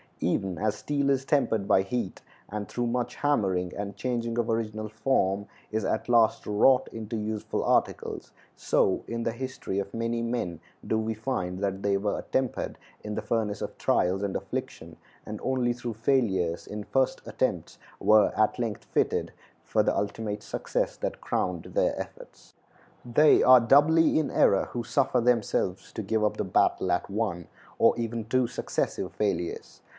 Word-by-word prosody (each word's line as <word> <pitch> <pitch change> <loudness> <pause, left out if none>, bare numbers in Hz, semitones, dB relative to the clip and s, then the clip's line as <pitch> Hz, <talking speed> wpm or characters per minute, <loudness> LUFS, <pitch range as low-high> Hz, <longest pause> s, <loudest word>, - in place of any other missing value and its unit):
Even 95 -2 -1
as 110 0 0
steel 140 -1 -1
is 135 -1 +1
tempered 115 -9 +1
by 95 - +5
heat, 110 0 -3 0.3
and, 105 0 -4
through 120 - -2
much 120 0 -1
hammering 95 -11 +1
and 100 -1 -5
changing 120 -2 -2
of 120 -1 0
original 110 -1 -2
form, 100 -3 0 0.2
is 110 0 -1
at - - -1
last 115 -2 +4
wrought 125 +5 +4
into 115 0 -5
useful 105 0 -3
articles, - - 0 0.2
so 95 - +1
in 115 0 -3
the 115 - 0
history 130 -5 -5
of 100 0 -5
many 115 0 -1
men 115 -8 -2 0.3
do 110 - 0
we 110 0 -1
find 95 -6 -3
that 100 -1 -2
they 100 -1 +2
were 100 +1 -1
attempered 130 -2 -2 0.3
in 105 - -4
the - - -2
furnace 105 -1 -1
of - - -5
trials 95 +2 +1
and 100 -2 -2
affliction, - - -5 0.3
and 105 0 -6
only 125 -2 +1
through 120 -1 -5
failures 105 -8 +1
in 105 0 -5
first 130 +4 0
attempts - - -2 0.2
were 110 0 +5
at 110 +3 +2
length 115 -4 -3
fitted - - 0 0.3
for - - +1
the - - +1
ultimate 105 0 -2
success - - -2
that - - -4
crowned 90 -3 -1
their - - +1
efforts. - - -10 0.5
They 135 +6 +5
are 130 0 +9
doubly 150 +7 +5
in 155 - -1
error 100 - +4
who 120 - -3
suffer 125 +1 +1
themselves 115 -6 0
to 110 - -4
give 110 +2 0
up 105 - +1
the - - 0
battle 95 - +2
at 90 - 0
one, 100 -5 -2 0.3
or - - +5
even 115 -1 -3
two 130 +2 +2
successive, - - -3
failures. 95 -5 -3
110 Hz, 165 wpm, -27 LUFS, 100-120 Hz, 0.5 s, are